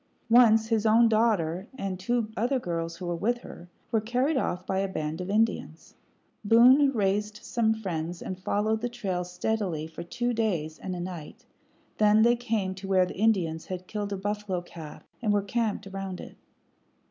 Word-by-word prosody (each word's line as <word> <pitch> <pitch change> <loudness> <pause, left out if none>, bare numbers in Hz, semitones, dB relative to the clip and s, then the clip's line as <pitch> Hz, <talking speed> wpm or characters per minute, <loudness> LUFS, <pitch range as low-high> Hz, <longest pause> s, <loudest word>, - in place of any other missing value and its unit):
Once 225 -2 +6
his 225 -1 +2
own 230 +2 +6
daughter, 205 -5 +1
and 195 -5 -3
two 230 +3 0
other 245 +5 +1
girls 165 -6 -3
who 185 - -6
were 175 - -1
with 230 +8 0
her, 175 -6 -11 0.2
were 225 -2 +2
carried 250 +7 0
off 185 -8 -1
by 190 - -1
a 195 - 0
band 155 -2 -4
of 180 - -5
Indians. 210 -6 -1 0.5
Boone 250 +6 +6
raised 210 -1 -1
some 225 -2 +1
friends 175 -6 -3
and 185 0 -6
followed 215 +3 0
the 245 - -1
trail 195 -7 -3
steadily 180 -2 -2
for 160 +1 -8
two 240 +8 -2
days 175 -9 -1
and 185 -1 -4
a - - -5
night; 175 -4 -7 0.5
then 215 +1 +5
they 240 +1 +5
came 225 -6 -1
to 190 +1 -8
where 190 -1 +4
the - - -7
Indians 180 -8 +1
had 185 -1 -5
killed 205 +1 -4
a 200 - -2
buffalo 205 -1 -2
calf 165 -3 -10 0.2
and 215 -3 +1
were 205 -1 +2
camped 215 0 -1
around 195 -1 -5
it. - - -10
205 Hz, 180 wpm, -27 LUFS, 180-225 Hz, 0.5 s, Once